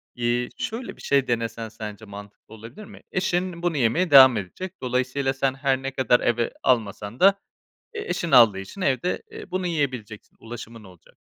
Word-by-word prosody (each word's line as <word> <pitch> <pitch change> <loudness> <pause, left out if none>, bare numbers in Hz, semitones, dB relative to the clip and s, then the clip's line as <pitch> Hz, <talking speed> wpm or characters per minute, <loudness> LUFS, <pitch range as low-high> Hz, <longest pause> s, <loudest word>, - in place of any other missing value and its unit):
İii, 120 0 -1
şöyle 230 +2 -5
bir - - -14
şey 140 -2 +1
denesen 115 -1 -2
sence 110 -1 -9
mantıklı 100 +1 -12
olabilir 115 - -11
mi? - - -14
Eşin 180 -2 -1
bunu 175 -3 0
yemeye 145 +8 +1
devam 130 -3 +9
edecek. 175 - -6
Dolayısıyla 130 +2 -1
sen 135 0 0
her 135 -1 0
ne 135 - -3
kadar 125 -2 +2
eve 120 0 0
almasan 110 -2 -1
da, 195 +1 +5 0.6
eee, 430 - -4
eşin 170 - -2
aldığı 115 -7 +6
için 95 - -9
evde, 135 +1 0
eee, 440 - -10
bunu 185 0 -2
yiyebileceksin, 130 -10 -4
ulaşımın 115 -1 -10
olacak. 90 -4 -18
125 Hz, 170 wpm, -24 LUFS, 115-165 Hz, 0.6 s, devam